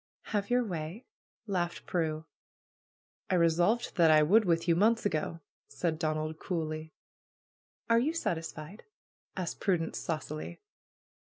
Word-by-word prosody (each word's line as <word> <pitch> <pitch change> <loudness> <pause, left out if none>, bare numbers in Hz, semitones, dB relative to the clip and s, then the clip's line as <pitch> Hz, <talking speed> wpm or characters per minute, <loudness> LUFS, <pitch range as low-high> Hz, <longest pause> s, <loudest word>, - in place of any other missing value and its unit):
"Have 205 -1 0
your 245 0 +3
way!" 175 +3 -5 0.4
laughed 180 -4 -2
Prue. 160 -2 -1 1.0
"I 185 - +2
resolved 175 +8 +2
that 165 -2 +6
I 155 -1 +7
would 210 +8 +5
with 170 -1 +1
you, 170 - +4
months 220 +5 +3
ago," 165 -2 -1 0.3
said 160 -3 -2
Donald 155 -1 -2
coolly. 160 -3 -3 1.0
"Are 230 0 +5
you 290 +7 +1
satisfied?" 165 - -4 0.5
asked 180 -2 -3
Prudence 170 -4 0
saucily. 155 -1 -4
170 Hz, 120 wpm, -31 LUFS, 155-200 Hz, 1.0 s, I